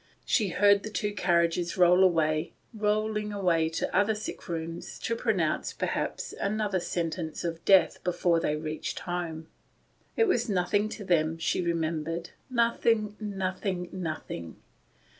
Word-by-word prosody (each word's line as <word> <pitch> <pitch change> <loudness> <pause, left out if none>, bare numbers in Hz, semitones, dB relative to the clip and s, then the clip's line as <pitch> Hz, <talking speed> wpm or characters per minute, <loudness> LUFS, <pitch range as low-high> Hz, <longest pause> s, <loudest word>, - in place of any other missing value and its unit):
She 215 -5 +2
heard 200 +3 +4
the 220 - -6
two 210 -1 -2
carriages 170 -2 +1
roll 180 +1 +6
away 160 -3 +2
— - - -39
rolling 210 0 0
away 175 -5 +2
to 165 - -3
other 205 +3 +3
sick 210 - -7
rooms, 165 0 -5
to 230 - -2
pronounce, 200 -10 0
perhaps, - - -3
another 205 -1 0
sentence 165 -2 -3
of 165 -1 -4
death 185 -5 +5
before 175 -1 +2
they 150 -2 0
reached 155 0 -4
home. 170 -3 -4 0.7
It 450 - +4
was 240 - +1
nothing 205 +2 +1
to 215 - -7
them, 160 -2 +2
she 165 - 0
remembered; 165 0 -2 0.2
nothing, 230 -3 +2
nothing, 190 -3 -3
nothing. 155 - -5
180 Hz, 140 wpm, -28 LUFS, 165-210 Hz, 0.7 s, roll